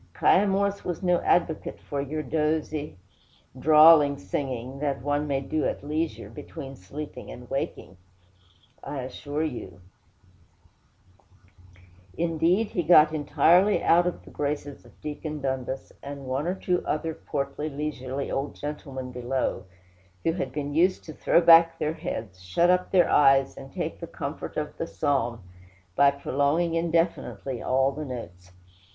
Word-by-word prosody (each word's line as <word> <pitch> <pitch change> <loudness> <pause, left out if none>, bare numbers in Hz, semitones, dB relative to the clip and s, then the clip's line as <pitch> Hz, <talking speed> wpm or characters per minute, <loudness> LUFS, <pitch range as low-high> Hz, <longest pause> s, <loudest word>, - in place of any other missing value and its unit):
'Kiah 200 +3 +4
Morse 200 +1 0
was 175 +2 -4
no 180 -1 +3
advocate 165 -2 0
for 140 -1 -4
your 155 +2 -4
dozy, 150 -2 -1 0.6
drawling 150 -1 +7
singing, 130 +6 -4
that 140 -4 -2
one 145 +1 0
may 135 -1 0
do 155 +3 -2
at - - -2
leisure, 155 +2 -3
between 135 -2 -9
sleeping 140 +10 -8
and 125 0 -10
waking, 115 -8 -4 0.9
I 140 - -4
assure 145 +4 -4
you; 105 - -5 2.4
indeed, 170 +5 +1
he 175 - -1
got 155 -2 +6
entirely 160 +7 +3
out 175 +1 +4
of 180 - -4
the - - -13
graces 145 -1 -4
of - - -20
Deacon 150 0 -5
Dundas 130 -1 -3
and 140 -1 -8
one 130 +5 -2
or 180 - 0
two 180 -2 -1
other 160 +1 -2
portly, 140 +1 -4
leisurely 140 -2 -4
old 135 +1 -2
gentlemen 135 -3 -6
below, 125 -2 -2 0.6
who 165 - +2
had 135 -7 -3
been 145 +1 -4
used 180 +4 +2
to 155 - -9
throw 170 - +3
back 165 0 +7
their 155 +1 -1
heads, 100 - -6
shut 95 - +2
up 180 0 +1
their 180 -2 +4
eyes, 135 -1 +4
and 135 0 -11
take - - -4
the - - -6
comfort - - -6
of - - -3
the - - -3
psalm, 120 -6 -1 0.5
by 140 - +6
prolonging 145 +4 0
indefinitely 165 - -1
all 135 +1 +2
the 150 +3 -6
notes. 90 - -8
145 Hz, 145 wpm, -26 LUFS, 135-165 Hz, 2.4 s, drawling